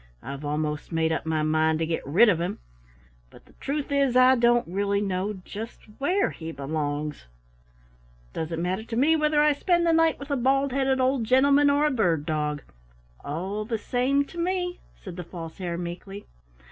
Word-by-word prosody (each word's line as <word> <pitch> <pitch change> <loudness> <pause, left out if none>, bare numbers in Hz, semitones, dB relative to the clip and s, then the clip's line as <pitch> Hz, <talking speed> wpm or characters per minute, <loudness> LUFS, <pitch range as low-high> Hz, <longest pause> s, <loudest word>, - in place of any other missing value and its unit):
"I've 140 +1 -7
almost 150 +1 -3
made 160 -1 +1
up 160 - -2
my 155 -1 0
mind 155 +1 +2
to 165 - -1
get 165 0 -2
rid 180 +12 +5
of 175 -5 +2
him, 175 - -2 0.7
but - - -18
the - - -22
truth 285 0 -3
is 275 -3 +2
I 255 +1 +7
don't 240 -1 +3
really 200 +3 0
know 195 0 -2
just 225 +3 -8 0.2
where 365 +8 +1
he 165 0 -7
belongs." 145 - -3 1.1
"Doesn't 165 +1 -3
matter 185 +4 -1
to 230 0 -6
me 290 +7 +4
whether 300 -1 +2
I 300 0 +4
spend 345 +3 +1
the 335 - +3
night 325 -1 +3
with 280 +1 -8
a 280 - +1
bald 270 +2 +2
headed 265 0 +1
old 255 -2 +1
gentleman 280 +4 +4
or 285 +1 +3
a 300 - +2
bird 175 - +1
dog 150 -2 -2 0.6
all 190 +8 -3
the 225 +1 -2
same 260 +6 +1
to 340 - -10
me," 360 0 -1 0.2
said 185 -4 -10
the 180 - -5
False 165 -1 -9
Hare 175 -2 -3
meekly. 180 +4 -7
210 Hz, 185 wpm, -26 LUFS, -, 1.1 s, I